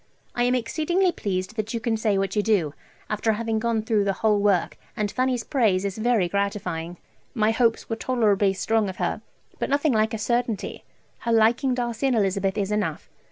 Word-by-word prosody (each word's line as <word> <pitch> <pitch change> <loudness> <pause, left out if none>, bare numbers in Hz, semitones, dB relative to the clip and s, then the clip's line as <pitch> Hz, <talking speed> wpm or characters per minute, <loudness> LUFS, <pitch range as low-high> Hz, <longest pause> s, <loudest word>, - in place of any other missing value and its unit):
I 240 - +1
am 250 +1 +2
exceedingly 340 +9 +1
pleased 185 - -3
that 215 +2 -2
you - - -1
can 225 0 0
say 215 -2 +1
what 195 +2 -1
you 210 - +3
do, 200 -9 +1 0.3
after 215 +1 0
having 225 0 -1
gone 225 -1 0
through 220 -2 +1
the 200 -1 +1
whole 210 -1 +4
work, 200 -4 +1 0.2
and 210 -2 -1
Fanny's 255 -2 0
praise 205 -8 +1
is 200 +1 -3
very 225 -5 +2
gratifying. 180 -3 -2 0.4
My 220 -1 +3
hopes 230 0 +1
were 225 - -2
tolerably 210 -6 +2
strong 220 +1 0
of 185 - -6
her, - - -2 0.4
but - - -2
nothing 285 0 +2
like 220 0 +1
a - - -3
certainty. 235 0 -2 0.4
Her 235 - -2
liking 230 +4 +3
Darcy 240 +1 -1
and 260 - +2
Elizabeth 195 -1 0
is 200 0 -1
enough. 200 -7 -2
220 Hz, 195 wpm, -24 LUFS, 200-235 Hz, 0.4 s, whole